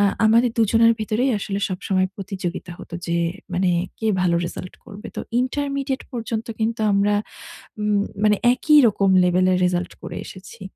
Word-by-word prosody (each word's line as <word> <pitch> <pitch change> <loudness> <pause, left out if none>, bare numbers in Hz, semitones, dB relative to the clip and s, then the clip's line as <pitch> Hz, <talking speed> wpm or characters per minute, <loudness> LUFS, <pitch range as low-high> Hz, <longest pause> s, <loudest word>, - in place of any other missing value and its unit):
আ - - +4 0.2
আমাদের 230 +3 +4
দুজনের 230 +1 +5
ভিতরেই 220 +5 0
আসলে 195 0 -3
সবসময় 185 0 -1
প্রতিযোগিতা 190 -3 -5
হত। - - -11 0.2
যে 170 - 0 0.4
মানে 180 0 +2 0.3
কে 220 - -3
ভালো 175 -2 +2
রেজাল্ট 180 +1 -8
করবে। 205 +2 -10
তো - - -2 0.2
ইন্টারমিডিয়েট 275 0 -2
পর্যন্ত 230 -1 -4
কিন্তু 225 +1 -1
আমরা 200 +1 +2 0.7
উম 210 -1 +1 0.3
মানে 210 0 +5 0.2
একই 300 +4 +4
রকম 195 -2 +1
লেভেলের 180 +1 +3
রেজাল্ট 180 0 -1
করে - - -7
এসেছি। 195 +4 -12
205 Hz, 150 wpm, -22 LUFS, 185-230 Hz, 0.7 s, দুজনের